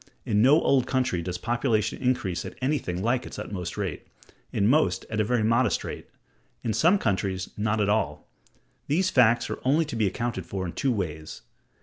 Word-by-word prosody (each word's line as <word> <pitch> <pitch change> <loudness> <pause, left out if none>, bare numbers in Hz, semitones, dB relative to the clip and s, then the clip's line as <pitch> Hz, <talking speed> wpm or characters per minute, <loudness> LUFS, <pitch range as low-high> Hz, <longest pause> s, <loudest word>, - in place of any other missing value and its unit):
In 105 -1 +2
no 140 +6 +6
old 135 -6 +2
country 125 -10 0
does 90 +1 -4
population 115 0 0
increase 105 -9 0
at - - -9
anything 130 -10 -1
like 120 +2 0
its - - -9
utmost 95 -5 -5
rate; - - -4 0.4
in 100 - +1
most, 105 - +2
at 110 0 +1
a - - +3
very 120 +1 +1
moderate 115 0 +2
rate: - - -7 0.6
in 110 - -1
some 175 - +4
countries, 95 - -1
not 105 +1 0
at 105 - +2
all. 100 -8 -1 0.6
These 185 +6 +1
facts 120 -2 +4
are - - -4
only 150 +5 +3
to 145 - -6
be 110 -3 +2
accounted 95 -2 -3
for 95 -1 -3
in 85 - -5
two 135 - 0
ways. 80 -8 -4
110 Hz, 190 wpm, -26 LUFS, 95-130 Hz, 0.6 s, no